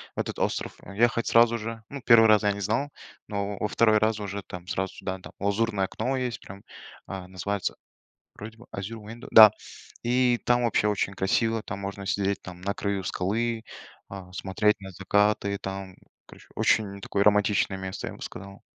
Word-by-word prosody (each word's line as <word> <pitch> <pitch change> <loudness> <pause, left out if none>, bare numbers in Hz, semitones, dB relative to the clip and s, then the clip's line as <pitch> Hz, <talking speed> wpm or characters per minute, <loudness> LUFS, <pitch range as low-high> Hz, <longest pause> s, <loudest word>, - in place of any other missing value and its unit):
в - - -5
этот - - -3
остров - - -1 0.2
ехать 115 +2 +2
сразу 115 0 +5
же. 115 0 -6
Ну, 140 -1 -7
1 115 -2 +7
раз 105 -1 +6
я 105 - +3
не 100 - -6
знал, 115 +9 0 0.4
но 100 -1 -3
во - - 0
2 110 -1 +4
раз 110 0 +1
уже, 100 -1 -4
там, 90 0 -9
сразу 95 +1 -2
сюда, 95 0 -4
да. - - -11
Лазурное 100 0 0
окно 125 +7 -2
есть, 125 -2 -3
прям, 100 +1 -12 0.4
а, 95 -1 -6
называется, 95 +1 -3 0.6
вроде 110 +2 -9
бы 120 - -16
Azure 105 +3 -6
Window, 115 +2 -9
да. 110 -2 +11 0.5
И 125 0 +2
там 120 0 +3
вообще 110 -2 +2
очень 100 -1 0
красиво, 110 +4 +1
там 95 - -6
можно 100 0 -6
сидеть, 100 0 0
там, 90 -1 -10
на 100 +2 -1
краю 100 -1 -2
скалы, 110 +6 -1 0.5
а, 95 -2 -9
смотреть 100 +2 +1
на 95 - -8
закаты 100 +2 +1
и - - -4
там, 95 -1 -6 0.3
короче, - - -16
очень 100 -2 +1
такое 100 +1 0
романтичное 105 -1 +3
место, 95 0 -5
я - - -5
бы - - -16
сказал. 100 0 -9
100 Hz, 185 wpm, -26 LUFS, 95-115 Hz, 0.6 s, да